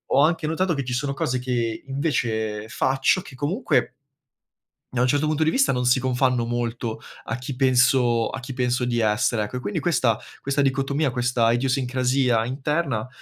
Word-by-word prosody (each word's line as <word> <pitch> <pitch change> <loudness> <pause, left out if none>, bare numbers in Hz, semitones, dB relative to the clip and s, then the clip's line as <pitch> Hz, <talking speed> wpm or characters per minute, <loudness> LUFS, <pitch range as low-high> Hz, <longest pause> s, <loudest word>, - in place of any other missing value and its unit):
ho - - +5
anche 160 +1 +2
notato 170 +2 0
che 140 - -2
ci 125 - -3
sono 140 +3 -1
cose 130 -1 -1
che 120 -3 -2
invece 110 -7 -2
faccio 135 +10 +1
che 160 - -13
comunque 160 - 0 1.0
da 125 - 0
un 125 - +3
certo 145 +3 +1
punto 155 0 0
di 155 - +3
vista 270 +9 +3
non 125 -1 -1
si 125 +1 +4
confanno 125 -1 +1
molto 120 -1 -3 0.2
a 115 - -4
chi 125 +1 -6
penso 125 -2 +3
a - - -5
chi 130 +1 -7
penso 125 0 0
di 120 -1 0
essere, 110 +1 +1
ecco. 105 +4 -4
E - - -3
quindi 105 -4 -3
questa 130 -10 +1 0.2
questa 140 +1 0
dicotomia, 140 +2 +1
questa 120 -2 +1
idiosincrasia 125 -1 +1
interna, 135 -2 -2
125 Hz, 175 wpm, -23 LUFS, 120-140 Hz, 1.0 s, ho